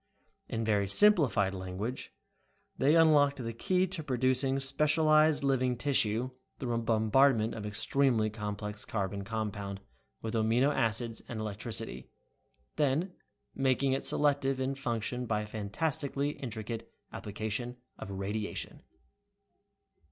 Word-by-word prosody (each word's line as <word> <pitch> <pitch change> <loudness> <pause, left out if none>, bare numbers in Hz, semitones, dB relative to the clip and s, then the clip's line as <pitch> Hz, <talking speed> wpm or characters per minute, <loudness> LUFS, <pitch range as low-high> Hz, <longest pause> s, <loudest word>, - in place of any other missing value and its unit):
In 115 0 -2
very 105 -2 +2
simplified 125 - +4
language 95 +6 -5 0.6
they 150 -1 +3
unlocked 150 -4 +5
the 115 -3 -4
key 185 +10 +1
to 185 -2 -4
producing 130 0 +1
specialized 155 +2 +3
living 130 -2 +1
tissue 125 -2 +1 0.3
through 120 -3 -3
a - - +1
bombardment 115 +1 +3
of 110 - -6
an - - -2
extremely 115 0 +1
complex 105 -1 -5
carbon 100 -1 -3
compound 105 -2 -4 0.4
with 110 0 -5
amino 115 +6 +2
acids 115 -1 0
and 115 - -5
electricity, 110 - -4 0.7
then 155 +5 +1 0.4
making 135 0 +1
it 135 - -1
selective 140 -2 +2
in 130 +1 -1
function 125 -2 -3
by 105 -1 0
a - - -5
fantastically 140 +7 -2
intricate 115 -3 -6 0.2
application 110 +4 -4 0.2
of 100 - -7
radiation. 100 +2 -4
120 Hz, 120 wpm, -31 LUFS, 110-140 Hz, 0.7 s, unlocked